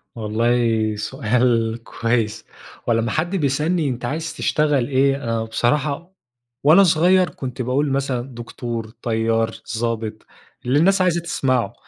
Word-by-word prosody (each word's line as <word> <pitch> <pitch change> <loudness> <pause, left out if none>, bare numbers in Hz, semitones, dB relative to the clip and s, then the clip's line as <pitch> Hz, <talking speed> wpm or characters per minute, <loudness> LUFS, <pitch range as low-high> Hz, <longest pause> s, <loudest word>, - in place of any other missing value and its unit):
والله، 115 0 +1
سؤال 115 0 0
كويس. 115 -2 -1 0.4
هو - - +4
لما 115 0 0
حد 175 +5 -1
بيسألني 150 +1 +1
أنت 125 -1 -4
عايز 155 +4 -3
تشتغل 145 -5 +1
إيه؟ 135 0 +2 0.2
آآ، - - -1
بصراحة 140 +10 -1 0.5
وأنا 160 +7 +7
صغير 180 +2 +4
كُنت 130 -1 -6
باقول 135 +4 0
مثلًا 135 -2 -1
دكتور، 115 -1 -5
طيار، 115 -1 0 0.2
ظابط، 110 -2 -3 0.4
اللِّي 130 +4 +3
النّاس 190 +4 +4
عايزة 175 -2 +2
تسمعه. 130 -7 0
125 Hz, 125 wpm, -21 LUFS, 115-150 Hz, 0.5 s, وأنا